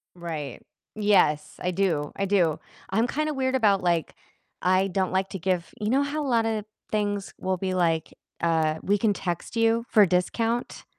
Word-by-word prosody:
Right. 160 -6 -6 0.3
Yes, 195 -8 +2
I 180 - 0
do, 170 -6 0
I 195 - -1
do. 180 -6 +2 0.3
I'm 220 +5 +2
kinda 305 +3 -1
weird 260 -1 0
about, 205 -6 +3
like, 170 -3 0 0.5
I 185 +2 +3
don't 190 0 -1
like 190 +1 0
to 190 - -5
give 180 -1 -1
you 210 0 -1
know 270 +3 +3
how 295 +1 -2
a - - -2
lot 230 -3 +2
of 220 -2 -1 0.3
things 205 -2 -1
will 185 0 -1
be, 185 0 -2
like, 165 -3 0 0.3
uh, 160 -2 +1
"We 205 +1 +2
can 210 +1 +2
text 175 +4 -4
you 230 +1 +2
for 215 -3 +6
a - - +4
discount"? 225 +7 -1
195 Hz, 185 wpm, -26 LUFS, 175-225 Hz, 0.5 s, for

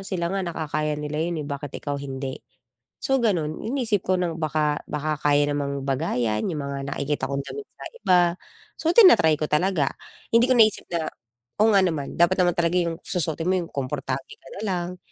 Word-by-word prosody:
sila 170 -2 -2
nga 195 - 0
nakakaya 155 -3 -2
nila 150 0 -4
yun, 170 +2 -1
eh, - - -8
bakit 140 -1 -6
ikaw 145 -1 -2
hindi, 135 -1 -5 0.6
so 270 -1 +1
ganun. 165 -8 0
Iniisip 225 -6 0
ko 185 0 +3
ng 170 -2 -1
baka 150 -1 0
baka 150 0 -2
kaya 145 0 +3
namang 140 -1 -2
bagayayan 120 -5 0
yung 150 -4 -3
mga 140 0 -4
nakikita 145 +1 -2
kong 140 0 -1
damit 425 - -7
sa - - -9
iba, 185 - +3 0.6
so 325 - 0
tina-try 345 - +7
ko 155 - -1
talaga. 155 -2 +1 0.4
Hindi 235 +2 +6
ko 255 - +6
naisip 215 -2 +4
na, 165 -2 -1 0.6
oo 225 - +6
nga 195 - +7
naman, 155 -6 -2
dapat 175 +2 +4
naman 175 -1 +2
talaga 170 +1 +2
yung 170 -1 -1
susuotin 165 -1 -2
mo 190 - +3
yung 170 - -7
komportable 135 -1 -4
ka 135 - -15
nalang 180 -3 -2
155 Hz, 185 wpm, -24 LUFS, 145-180 Hz, 0.6 s, tina-try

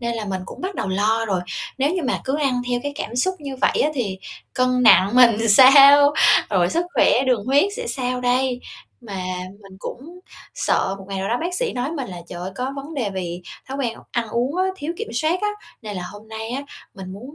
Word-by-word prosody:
nên 235 -1 -2
là 220 -2 -4
mình 190 -2 -3
cũng - - -10
bắt 375 +1 -4
đầu - - -3
lo 215 +4 +1
rồi, 190 -4 0 0.4
nếu 280 +3 +2
như 365 - -2
mà - - -1
cứ 270 +2 -1
ăn 255 -4 0
theo 245 0 0
cái 285 0 -4
cảm 240 -3 -5
xúc 375 +9 +1
như 275 -3 -7
vậy - - +1
á, 300 - +1
thì 205 -8 -3 0.3
cân 255 0 +1
nặng 200 -4 +6
mình 230 -3 +5
sao? 280 +5 +8 0.4
Rồi 180 -3 +2
sức 340 +1 0
khỏe 250 - +4
đường 245 -6 +1
huyết 275 +5 +4
sẽ - - -5
sao 250 - -2
đây? 250 0 0 0.5
Mà 200 - -7 0.5
mình 195 -1 -14
cũng 320 +12 -9 0.4
sợ 190 - 0
một 195 - -11
ngày 195 -1 -4
nào 190 +1 -3
đó 240 - 0
bác 350 +2 -3
sĩ 480 +4 -1
nói 250 +3 -3
mình 275 -8 -5
là 180 - -8
trời 175 - -8
ơi, 185 - -5
có 255 +2 -2
vấn 285 +4 -7
đề 235 -8 -2
vì 175 -1 -5 0.3
thói 270 - -5
quen 240 -4 -2
ăn 235 -2 -2
uống 250 +8 -1
á, 370 - +2
thiếu 315 0 -4
kiểm - - -5
soát 315 +8 0
á. 420 - +1 0.3
Nên 210 -2 -6
là 180 - -4
hôm 210 +1 -13
nay 220 0 -6
á, 270 +3 -3 0.3
mình 190 -1 -8
muốn 250 +9 -10
250 Hz, 235 wpm, -21 LUFS, 210-280 Hz, 0.5 s, sao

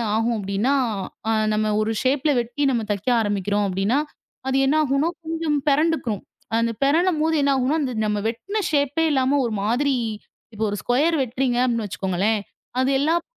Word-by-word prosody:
ஆகும் 225 +2 +1
அப்படி 200 -1 -5
என்றால் 240 -5 +1 0.3
அ - - +3 0.2
நாம 215 0 +1
ஒரு 220 - 0
ஷேப் 265 +2 +1
வெட்டி 240 +5 -3
நாம 235 -4 0
தைக்க 205 +1 -4
ஆரம்பிக்கிறோம். 205 -1 0
அப்படி 190 0 -2
என்றால் 285 +6 +1 0.4
அது 265 0 +1
என்ன 280 - +2
ஆகும் 275 -2 0
என்றால்? 330 +5 0
கொஞ்சம் 325 -1 -1
பிறழும்போது 295 - +1
என்ன 280 0 +3
ஆகும் 260 +1 +1
என்றால்? - - +1
அந்த 255 -3 -2
நம்ம 210 -1 0
வெட்டின 395 - -3
ஷேப்பே 290 +2 +1
இல்லாமல் 270 0 +2
ஒரு 230 - -2
மாதிரி 260 +6 +1 0.6
இப்போ 220 +1 -1
ஒரு 205 - -3
ஸ்குயர் 300 +7 +2
வெட்டுறீங்க. 255 0 -1
அப்படின்னு 230 -3 0
வைச்சுக்கோங்களேன். 195 +3 0 0.4
அது 260 - +1
எல்லாம். 325 +4 +1
255 Hz, 165 wpm, -23 LUFS, 220-290 Hz, 0.6 s, அ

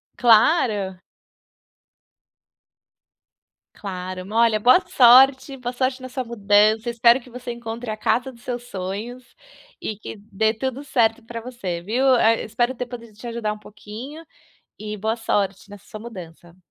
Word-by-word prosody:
Claro! 215 - +3 2.7
Claro. 185 -1 -6
Olha, 230 -1 +3
boa 250 +10 +6
sorte, 265 +2 +6
boa 245 -1 -4
sorte 255 +1 -1
nessa 255 0 -5
mudança, 215 0 +2
eu - - -1
espero 235 +2 +4
que 250 - -17
você 250 0 -7
encontre 235 0 -7
a 215 - -5
casa 245 +4 0
dos 235 -2 -19
seus 245 -1 -5
sonhos 220 +3 -6 0.6
e 215 - -4
que 220 - -9
dê 220 +2 +1
tudo 260 +4 -4
certo 235 -4 +1
pra 230 0 -7
você, 200 -8 -5
viu. 230 +9 -1
Ah, 230 -1 +4
eu - - -5
espero 240 +3 -1
ter 250 -1 -5
podido 235 -2 -10
te 215 +4 -10
ajudar 230 -2 -3
um 210 - -12
pouquinho 220 +10 -10 0.5
e 210 0 -6
boa 220 +3 -2
sorte 200 -4 -2
nessa 205 -1 -13
sua 215 - -8
mudança. 175 -6 -11
230 Hz, 150 wpm, -22 LUFS, 210-245 Hz, 2.7 s, boa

